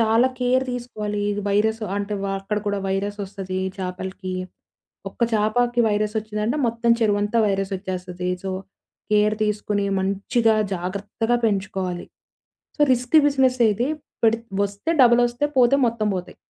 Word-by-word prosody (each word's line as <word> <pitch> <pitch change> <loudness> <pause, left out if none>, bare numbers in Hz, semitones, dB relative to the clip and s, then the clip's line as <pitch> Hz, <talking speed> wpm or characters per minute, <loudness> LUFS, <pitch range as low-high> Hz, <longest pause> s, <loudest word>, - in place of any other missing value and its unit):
చాలా 225 +3 +4
కేర్ 255 +1 +2
తీసుకోవాలి. 215 -4 -4
ఇది 205 0 -3
వైరసు 220 +2 +1
అంటే 205 +1 -2
వ - - -1
అక్కడ 210 +2 -2
కూడా 205 -1 0
వైరసోస్తది 195 -1 -3 0.2
చాపలకి. 185 0 -5 0.8
ఒక్క - - -28
చాపాకి 240 +3 +2
వైరసోచ్చిందంటే, 215 +4 -1
మొత్తం 235 0 0
చెరువంతా 205 +1 +2
వైరసోచ్చేస్తది. 185 -2 -3
సో, 190 - -2 0.6
కేర్ 210 0 +3
తీసుకొని, 210 -1 -1
మంచిగా 215 +4 +1 0.2
జాగ్రత్తగా 205 +6 -2
పెంచుకోవాలి. 190 -3 -2 0.7
సో - - -16
రిస్కీ 250 +5 +4
బిజినెసే 255 -4 +3
ఇది 240 +6 -1 0.4
పెడిత్ 225 +1 +2 0.2
వస్తే 200 +11 -3
డబలోస్తాయి, 240 +4 +3
పోతే 250 +2 +5
మొత్తం 225 -2 -2
బోతాయి. 180 - -7
210 Hz, 120 wpm, -23 LUFS, 195-235 Hz, 0.8 s, పోతే